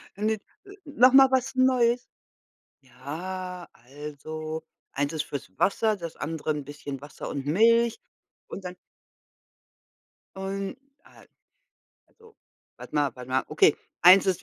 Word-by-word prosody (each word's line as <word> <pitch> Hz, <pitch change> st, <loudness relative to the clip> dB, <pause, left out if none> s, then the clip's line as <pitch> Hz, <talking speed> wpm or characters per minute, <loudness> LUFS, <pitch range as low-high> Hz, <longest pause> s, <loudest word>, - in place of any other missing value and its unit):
eine, 215 Hz, +2 st, 0 dB
äh, 215 Hz, -, -5 dB, 0.5 s
noch 260 Hz, -3 st, +5 dB
mal 270 Hz, 0 st, +8 dB
was 260 Hz, 0 st, +1 dB
Neues. 250 Hz, -2 st, +3 dB, 0.8 s
Ja, 175 Hz, +8 st, -7 dB
also, 150 Hz, +4 st, -7 dB, 0.3 s
eins 145 Hz, +2 st, -1 dB
ist 155 Hz, -1 st, -1 dB
fürs 140 Hz, -8 st, -6 dB
Wasser, 215 Hz, +2 st, +2 dB
das 170 Hz, -3 st, -7 dB
andere 155 Hz, 0 st, -3 dB
'n 150 Hz, -1 st, -3 dB
bisschen 145 Hz, -1 st, -7 dB
Wasser 145 Hz, -, -8 dB
und 140 Hz, -1 st, -4 dB
Milch 230 Hz, +8 st, +4 dB, 0.5 s
und 195 Hz, -, -7 dB
dann 180 Hz, -, -6 dB, 1.6 s
Und, 195 Hz, +3 st, -4 dB, 0.3 s
al -, -, -19 dB, 0.8 s
also, 450 Hz, -1 st, -21 dB, 0.4 s
warte -, -, -12 dB
mal 145 Hz, -2 st, +2 dB
warte 125 Hz, 0 st, -10 dB
mal. 130 Hz, +1 st, +1 dB
Okay, 155 Hz, -1 st, +4 dB, 0.3 s
eins 185 Hz, +3 st, +8 dB
ist 185 Hz, -3 st, 0 dB
180 Hz, 130 wpm, -26 LUFS, 145-220 Hz, 1.6 s, mal